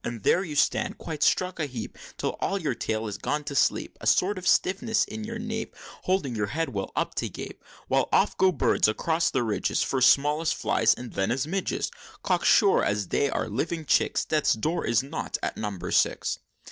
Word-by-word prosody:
So 120 0 -4
there 180 - +3
you 155 -5 -6
stand, - - +1
quite 155 -3 -6
struck 185 +3 +2
a 155 - 0
heap, 125 -5 -7 0.2
Till - - -1
all 195 - 0
your 155 -7 -1
tail 110 -1 -2
is 105 -2 -5
gone 150 0 -2
to 140 - -5
sleep; 140 - 0
A - - -3
sort 195 +1 +3
of 185 - -6
stiffness 220 +4 +2
in 220 - -7
your 230 +1 -5
nape, 225 0 -5 0.3
Holding 180 -10 0
your 105 -2 -1
head 160 +7 -2
well 100 -6 -4
up - - -1
to - - -2
gape; - - -9 0.2
While - - +1
off - - +3
go 190 0 +4
birds 130 -10 +2
across 160 +10 +1
the 130 - 0
ridges, 110 -3 0
First 130 -2 +4
small 150 +2 +3
as 165 - +1
flies, - - +2
and 125 -1 -9
then 95 - 0
as 130 +2 0
midges, 190 +4 -2 0.3
Cocksure, - - +4
as 100 -2 -1
they 140 - +1
are - - -2
living 155 +9 -3
chicks, - - +2
Death's 155 -2 +2
Door 155 +11 -2
is 115 +2 +2
not 135 - -4
at - - -2
Number 100 -4 -4
Six!" - - +1
145 Hz, 210 wpm, -26 LUFS, 115-180 Hz, 0.3 s, go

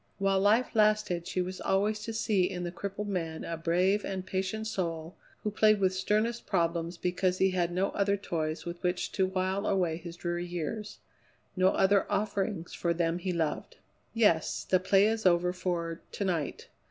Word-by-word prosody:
While 195 -1 +2
life 215 +6 +3
lasted 210 -5 +2
she 185 - -1
was 185 +1 -6
always 205 +3 +1
to 225 - -3
see 210 -4 +1
in 180 -2 -4
the 175 - -3
crippled 200 +3 -5
man 165 -5 -3
a 170 - -3
brave 180 +5 +1
and 190 -1 -4
patient 190 +4 -2
soul 170 -5 -3 0.3
who 210 - -1
played 215 0 +4
with 190 -1 +2
sternest 215 +5 0
problems 170 -2 0
because 180 +1 0
he 190 0 +3
had 175 -2 0
no 185 +3 +1
other 200 0 +1
toys 160 -5 -3
with 175 0 -6
which 180 0 -1
to 190 -1 +1
while 190 +1 -1
away 180 -5 +1
his 170 0 -8
dreary 175 0 -3
years; 190 +5 -4 0.6
no 185 0 +4
other 195 +1 +2
offerings 200 -4 -1
for 170 -1 0
them 170 0 0
he 185 +1 -2
loved. 165 -3 -2 0.4
"Yes. 205 -8 +2
The 185 - +2
play 195 +2 +4
is 220 -2 +2
over 180 0 +3
for 170 -2 -3
to 200 - -2
night. 165 -7 -2
185 Hz, 180 wpm, -30 LUFS, 175-200 Hz, 0.6 s, played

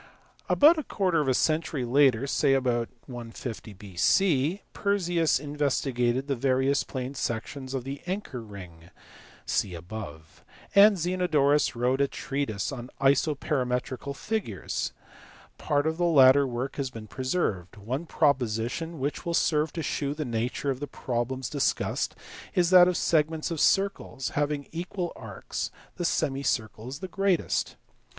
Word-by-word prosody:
About 310 +3 +6
a - - -3
quarter 185 - +1
of 145 - -2
a 130 - +3
century 155 -3 0
later, 130 -1 +4
say 135 0 +2
about 120 -3 0 0.2
150 115 -3 -7
B.C., 135 - +1
Perseus 175 -7 +1
investigated 135 -3 0
the 140 -1 -1
various 135 +2 +2
plane 130 0 -5
sections 130 +2 -4
of 130 - -2
the 135 +2 -6
anchor 180 - -4
ring 90 -6 -11 0.6
(see 90 -3 -1
above, 85 -3 -9 0.3
p. - - +5
47), - - +11
and 210 -2 0
Zenodorus 155 -6 +2
wrote 125 +3 +1
a 140 - +3
treatise 135 -8 -3
on 125 -2 -7
isoperimetrical 135 -2 0
figures. 195 - -3 0.7
Part 145 0 +1
of 160 0 0
the 175 - +2
latter 140 -3 +6
work 125 +2 -4
has 135 -2 -1
been 115 -3 -9
preserved; 110 - -2
one 130 +11 -4
proposition 135 +3 0
which 140 +2 -3
will 170 -1 -1
serve 150 -1 +2
to 165 - -3
shew 140 0 -2
the 155 0 -3
nature 120 +4 -1
of 130 - -4
the 145 - -4
problems 125 0 -3
discussed 145 -2 -1 0.4
is 175 -1 +3
that 180 -1 +9
"of 180 -1 +1
segments 160 0 +1
of 165 - -3
circles, 195 -9 +1
having 145 -1 -1
equal 175 +1 -4
arcs, - - -5 0.3
the 175 - -2
semicircle 135 -8 -1
is 140 +2 -6
the 190 - -4
greatest." 195 -1 0
140 Hz, 145 wpm, -27 LUFS, 120-160 Hz, 0.7 s, 47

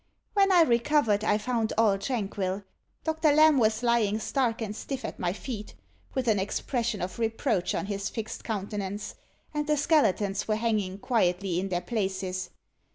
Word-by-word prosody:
When 395 -2 +4
I 350 -2 +7
recovered, 235 -4 +2
I 210 -1 +3
found 225 0 -1
all 210 -3 +4
tranquil. 200 -4 -2 0.4
Doctor 315 -1 +2
Lamb 305 -1 +6
was 220 0 +2
lying 235 -3 +2
stark 235 0 0
and 215 -2 -4
stiff 270 +3 -5
at - - -6
my 175 - 0
feet, 210 +1 -6 0.4
with 260 -2 -1
an 215 -3 +3
expression 225 +1 -2
of 185 +4 -5
reproach 220 -5 0
on - - -2
his 200 0 -3
fixed 225 -1 -6
countenance; 205 -1 -4 0.4
and 300 0 -2
the 300 0 +2
skeletons 215 - +2
were 215 - +2
hanging 215 -4 -1
quietly 185 -5 +1
in 195 +1 -3
their 175 -1 -1
places. 190 -2 -2
215 Hz, 160 wpm, -28 LUFS, 195-245 Hz, 0.4 s, I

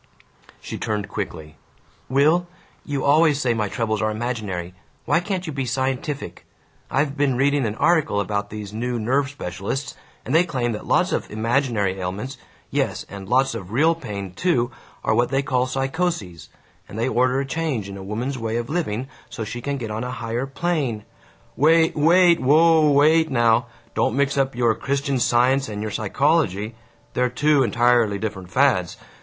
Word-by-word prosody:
She - - -7
turned 105 -3 -2
quickly. 80 -7 -6 0.5
"Will, 155 +7 +3 0.4
you 145 -2 -3
always 150 0 +4
say 125 -5 +1
my 105 -3 -1
troubles 110 -1 -1
are 110 - +1
imaginary. 105 -6 -4 0.3
Why 170 - +3
can't 185 0 -3
you 155 - -5
be 135 -2 -3
scientific? 130 +3 -3 0.5
I've 140 +2 0
been 140 -3 +1
reading 140 -1 +2
an 105 - -4
article 155 -6 +2
about 100 0 -2
these 105 -1 -7
new 120 +2 -2
nerve 135 +5 +1
specialists, 130 - -5 0.3
and 130 - -3
they 165 +2 +6
claim 125 -8 -2
that 105 - -6
lots - - +2
of - - -2
'imaginary' 110 -3 0
ailments, 105 +9 -5 0.3
yes, - - -1
and 100 -1 -9
lots 130 +1 +3
of 100 -5 -7
real 155 +8 +4
pain, 100 - -6
too, 125 - +1 0.3
are - - +2
what 120 +2 +2
they 135 +1 +1
call 130 -2 0
psychoses, 135 - -2 0.4
and 100 - -8
they 115 - 0
order 130 +1 +2
a 140 - -1
change 135 -8 -2
in 100 - -8
a 100 - -8
woman's 120 +7 -3
way 115 0 -2
of 120 0 -4
living 130 -8 -2 0.2
so 115 - -5
she 120 +3 -6
can 140 +2 -2
get 115 -4 -5
on 110 +3 -3
a 125 - -4
higher 120 0 -3
plane 135 -7 -2 0.3
" - - -32
"Wait! 165 0 +4
Wait! 170 +3 +5
Whoa 155 +3 +5
up! 145 - +3
Wait 160 +3 +4
now! 120 -2 +3 0.3
Don't - - +1
mix 140 0 +1
up 135 -2 0
your 120 -2 +3
Christian 140 +3 -1
Science 125 +2 +2
and 105 -1 -5
your 105 0 -3
psychology! 110 - +1 0.4
They're 125 0 +1
two 145 +3 +2
entirely 120 -2 +3
different 95 -4 -5
fads! 125 -10 +2
125 Hz, 175 wpm, -22 LUFS, 110-140 Hz, 0.5 s, they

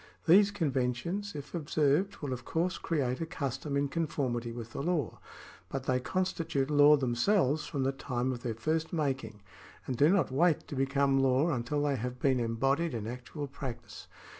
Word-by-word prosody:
These 195 +5 +7
conventions, 165 +3 -2
if 145 -1 -8
observed, 155 +4 +1
will 135 -3 -2
of 125 -1 -6
course 175 +6 -1
create 135 -5 -1
a - - 0
custom 140 -3 -3
in 140 0 +1
conformity 135 -7 -2
with 115 -1 -8
the - - -3
law; 155 - -1 0.5
but 135 -1 -4
they 130 -1 +1
constitute 165 -3 -1
law 145 0 +7
themselves 140 - +1
from 140 -2 -2
the 135 - +1
time 130 -2 -2
of 120 -2 -5
their 115 -3 -3
first 155 +8 -1
making, 135 - -2 0.4
and 130 - -2
do 145 +6 +5
not 190 -6 +2
wait 160 +4 +2
to - - -5
become 135 0 +2
law 135 +5 +3
until 145 +3 -1
they 140 -2 +1
have 125 +2 -4
been 130 -1 +2
embodied 135 +6 0
in 110 -2 -4
actual 125 +5 -6
practice. 135 -3 -8
140 Hz, 175 wpm, -31 LUFS, 125-160 Hz, 0.5 s, These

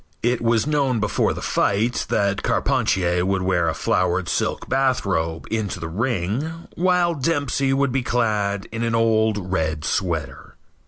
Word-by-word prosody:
It 120 +1 +1
was 115 0 +2
known 140 -5 +1
before 105 - +1
the - - -5
fight 110 +5 0
that 100 0 +1
Carpentier 90 -1 +1
would 95 0 0
wear 90 -3 +1
a 80 - -2
flowered 90 0 0
silk - - -1
bathrobe 100 -12 0
into 110 -4 -2
the 80 - -4
ring, 120 - -2
while 180 -1 +2
Dempsey 140 -2 0
would 135 0 +1
be 135 +1 0
clad 105 -5 0
in 115 +1 -4
an 115 -1 0
old 110 -4 +1
red 80 -3 -1
sweater. 85 -6 -3
110 Hz, 150 wpm, -22 LUFS, 90-130 Hz, -, was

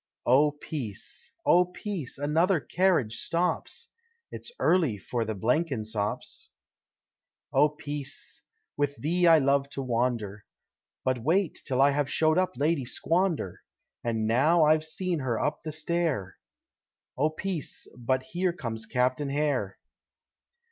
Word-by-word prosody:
Oh 145 +4 +5
Peace! 135 - -6
oh 180 +1 +6
Peace! 180 - -5
another 160 +5 +2
carriage 165 - +1
stops 175 +2 -1 0.4
It's - - -6
early 160 - +2
for 115 +4 -2
the 110 0 -3
Blenkinsops. 110 - -1 1.0
Oh 145 +3 +5
Peace! 145 -2 -5 0.3
with 145 0 0
thee 175 +5 +1
I 165 -1 +8
love 140 -1 +2
to 135 - -4
wander, 115 -4 -1 0.6
But 130 -1 +1
wait 165 - +1
till 135 -1 +2
I 140 - +5
have 145 0 0
showed 155 +2 +3
up 185 -9 -1
Lady 150 +1 +1
Squander, 165 - -1 0.4
And 115 -2 0
now 150 +9 +4
I've 155 +1 +4
seen 170 +2 -1
her 125 -5 -1
up 150 - -1
the 155 - -5
stair, 155 - -1 0.8
Oh 150 +4 +2
Peace! 170 0 -4
but 130 +2 0
here 175 +6 -1
comes 115 -8 -5
Captain 130 +4 0
Hare. 140 -9 0
145 Hz, 125 wpm, -28 LUFS, 125-165 Hz, 1.0 s, I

